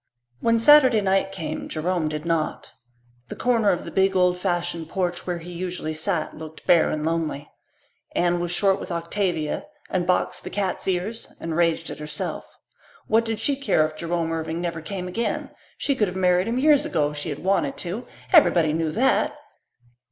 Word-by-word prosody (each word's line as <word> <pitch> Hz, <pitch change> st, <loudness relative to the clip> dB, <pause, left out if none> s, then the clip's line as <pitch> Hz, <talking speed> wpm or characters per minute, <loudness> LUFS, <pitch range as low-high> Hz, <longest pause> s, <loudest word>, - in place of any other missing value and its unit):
When 230 Hz, -, +3 dB
Saturday 260 Hz, -1 st, +7 dB
night 195 Hz, 0 st, +1 dB
came 160 Hz, -5 st, -5 dB
Jerome 165 Hz, 0 st, -1 dB
did 155 Hz, +1 st, -5 dB
not. 165 Hz, -2 st, -1 dB, 0.6 s
The -, -, -7 dB
corner 230 Hz, -4 st, +2 dB
of 180 Hz, -, 0 dB
the -, -, -7 dB
big, 190 Hz, 0 st, +2 dB
old 180 Hz, -1 st, +4 dB
fashioned 175 Hz, -3 st, -2 dB
porch 180 Hz, -1 st, -2 dB
where 175 Hz, -1 st, -1 dB
he 170 Hz, +1 st, -9 dB
usually 175 Hz, -2 st, -4 dB
sat 160 Hz, +1 st, -1 dB
looked 160 Hz, 0 st, -10 dB
bare 170 Hz, -2 st, +5 dB
and 155 Hz, 0 st, -2 dB
lonely. 160 Hz, -3 st, -2 dB, 0.7 s
Anne 175 Hz, 0 st, +2 dB
was 175 Hz, 0 st, -2 dB
short 195 Hz, +2 st, +2 dB
with 185 Hz, -, -7 dB
Octavia 170 Hz, -, -2 dB, 0.2 s
and 180 Hz, -2 st, 0 dB
boxed 180 Hz, -, 0 dB
the -, -, -6 dB
cat's 195 Hz, -2 st, -2 dB
ears 190 Hz, +5 st, -2 dB
and 165 Hz, -1 st, -4 dB
raged 165 Hz, -1 st, +1 dB
at -, -, -8 dB
herself. 150 Hz, 0 st, -4 dB, 0.6 s
What 225 Hz, +1 st, +2 dB
did 225 Hz, -2 st, -2 dB
she 280 Hz, +5 st, +1 dB
care 270 Hz, -, +2 dB
if 155 Hz, 0 st, -5 dB
Jerome 165 Hz, 0 st, -2 dB
Irving 160 Hz, 0 st, -3 dB
never 170 Hz, -2 st, -3 dB
came 180 Hz, +2 st, -5 dB
again? 230 Hz, +6 st, -2 dB, 0.3 s
She 285 Hz, -, 0 dB
could 220 Hz, -6 st, +1 dB
have 180 Hz, +1 st, -5 dB
married 180 Hz, +1 st, +3 dB
him 235 Hz, +2 st, -1 dB
years 290 Hz, +1 st, +5 dB
ago 150 Hz, -3 st, 0 dB
if 150 Hz, -, -8 dB
she 145 Hz, +3 st, -4 dB
had 145 Hz, -, -4 dB
wanted 175 Hz, -7 st, +1 dB
to 190 Hz, +7 st, -4 dB, 0.3 s
everybody 170 Hz, -, +5 dB
knew 160 Hz, 0 st, 0 dB
that! 265 Hz, +4 st, +2 dB
175 Hz, 185 wpm, -24 LUFS, 160-195 Hz, 0.7 s, Saturday